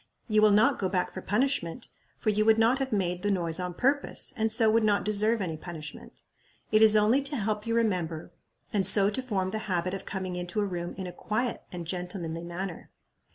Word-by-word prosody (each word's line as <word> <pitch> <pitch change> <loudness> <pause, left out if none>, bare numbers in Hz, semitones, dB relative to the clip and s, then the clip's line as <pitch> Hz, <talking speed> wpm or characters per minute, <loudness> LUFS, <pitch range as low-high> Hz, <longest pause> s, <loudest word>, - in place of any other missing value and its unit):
You 215 -2 +3
will 215 - +6
not 210 +2 +4
go 190 - 0
back 180 -1 -1
for 185 - -6
punishment, 230 -3 -1 0.3
for 215 - 0
you 210 +1 +2
would 220 0 +5
not 230 +4 +3
have 270 -1 -2
made 180 -4 0
the 205 - 0
noise 170 -4 0
on 180 -1 -4
purpose, 275 +6 0
and 220 -2 0
so 225 0 +3
would 225 +1 +3
not 205 -1 +2
deserve 215 +2 +2
any 165 -3 -3
punishment. 155 -2 -9 0.5
It 215 0 +4
is 220 -1 +7
only 215 +6 +4
to 280 +1 -2
help 210 -2 -2
you 230 - 0
remember, 180 -8 -1 0.4
and 200 -2 +2
so 195 +2 +4
to 260 - -2
form 195 -7 -2
the 215 - -2
habit 185 0 0
of 195 0 -5
coming 185 -2 -4
into 180 +3 -3
a 205 - +1
room 175 -3 -4
in 190 - -4
a 180 - -7
quiet 220 +6 -2
and 175 -2 -6
gentlemanly 175 -1 -4
manner." 175 +1 -6
200 Hz, 215 wpm, -28 LUFS, 180-220 Hz, 0.5 s, is